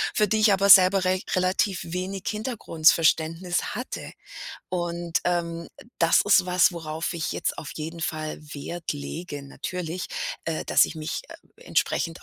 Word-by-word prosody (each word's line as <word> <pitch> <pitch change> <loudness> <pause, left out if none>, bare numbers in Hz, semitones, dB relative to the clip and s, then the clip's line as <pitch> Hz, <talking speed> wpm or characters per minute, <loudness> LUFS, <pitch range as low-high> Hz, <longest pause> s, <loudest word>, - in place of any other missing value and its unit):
für 210 - +3
die 220 +2 +1
ich 215 -1 +5
aber 200 +1 +2
selber 190 0 +8
rech 185 +1 +1
relativ 185 +1 +1
wenig 185 +3 -4
Hintergrundverständnis 170 -6 +1
hatte. 250 - -6 0.6
Und, 175 -1 -2
ähm, 170 -1 -2
äh, - - -15
das 165 0 +4
ist 200 -2 +4
was, 180 0 +4
worauf 160 0 -4
ich 165 - -2
jetzt - - -2
auf 145 - -6
jeden 165 +2 -6
Fall 155 -1 -3 0.2
Wert 165 +4 -5
lege 145 +1 -6
natürlich, 175 +5 -5 0.4
äh, 165 -1 -3
dass - - +5
ich - - -5
mich, 155 - -4
äh, - - -16
entsprechend 165 0 -1
175 Hz, 150 wpm, -25 LUFS, 165-185 Hz, 0.6 s, selber